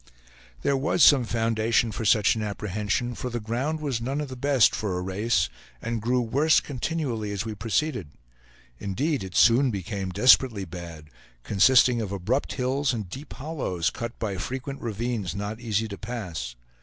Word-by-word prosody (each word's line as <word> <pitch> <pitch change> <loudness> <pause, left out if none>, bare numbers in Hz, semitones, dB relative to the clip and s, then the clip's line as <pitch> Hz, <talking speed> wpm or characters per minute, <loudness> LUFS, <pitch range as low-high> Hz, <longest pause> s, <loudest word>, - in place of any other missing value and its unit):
There 140 - +2
was 145 +4 +2
some 135 -5 +7
foundation 115 0 +1
for 110 +1 -4
such 105 0 +4
an 110 - -3
apprehension, 105 +3 -2
for 125 - -5
the 120 0 -3
ground 125 +8 -2
was 135 -6 -2
none 135 +4 -2
of 150 -2 -4
the 130 - -6
best 135 -2 +3
for 100 -4 -2
a - - -2
race, 95 -1 +1 0.3
and 115 - -3
grew 125 +3 +1
worse 140 +7 +3
continually 130 -6 -3
as 100 +2 -3
we 110 - -4
proceeded; 115 - -1 0.7
indeed 135 - -1
it 95 -1 -8
soon 125 +4 +5
became 95 -2 -4
desperately 115 -1 +4
bad, 80 -3 -9 0.3
consisting 120 +3 +4
of 105 -3 -4
abrupt 100 +8 -1
hills 130 +1 0
and 105 -6 -5
deep 140 +6 -8
hollows, 125 - -2
cut 115 0 -6
by 100 -4 -3
frequent 130 +6 -5
ravines 110 -4 -3
not 105 +2 -4
easy 110 -2 -1
to 100 -2 -8
pass. 90 - -5
115 Hz, 170 wpm, -26 LUFS, 100-130 Hz, 0.7 s, some